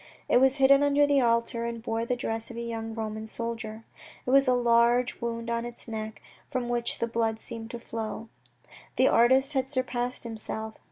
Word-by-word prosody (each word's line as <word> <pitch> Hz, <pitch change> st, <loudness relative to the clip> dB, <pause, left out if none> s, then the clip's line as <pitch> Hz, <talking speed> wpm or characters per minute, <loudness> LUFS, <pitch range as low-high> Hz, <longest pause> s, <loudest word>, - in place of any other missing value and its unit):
It 245 Hz, -, +4 dB
was 265 Hz, 0 st, +5 dB
hidden 275 Hz, 0 st, +6 dB
under 285 Hz, 0 st, +4 dB
the 285 Hz, -1 st, +3 dB
altar, 235 Hz, 0 st, +1 dB
and 235 Hz, 0 st, -4 dB
bore 225 Hz, 0 st, -2 dB
the 250 Hz, -, 0 dB
dress 225 Hz, -2 st, -3 dB
of 235 Hz, -, -8 dB
a -, -, -3 dB
young 225 Hz, -1 st, -5 dB
Roman 220 Hz, -1 st, -4 dB
soldier. 225 Hz, -1 st, -5 dB, 0.4 s
It 250 Hz, -, -1 dB
had 275 Hz, 0 st, +5 dB
a 255 Hz, -, +5 dB
large 240 Hz, 0 st, +3 dB
wound 230 Hz, 0 st, -3 dB
on 235 Hz, 0 st, -1 dB
its 240 Hz, 0 st, -8 dB
neck, 220 Hz, -1 st, -6 dB, 0.3 s
from 255 Hz, -3 st, -2 dB
which 240 Hz, -1 st, -1 dB
the -, -, 0 dB
blood 225 Hz, -1 st, -1 dB
seemed 230 Hz, -1 st, -6 dB
to 235 Hz, -, -6 dB
flow. 225 Hz, -1 st, -5 dB, 0.7 s
The -, -, +4 dB
artist 265 Hz, +4 st, +4 dB
had 265 Hz, -1 st, 0 dB
surpassed 250 Hz, -2 st, -2 dB
himself. 220 Hz, -1 st, -4 dB
235 Hz, 190 wpm, -28 LUFS, 225-250 Hz, 0.7 s, hidden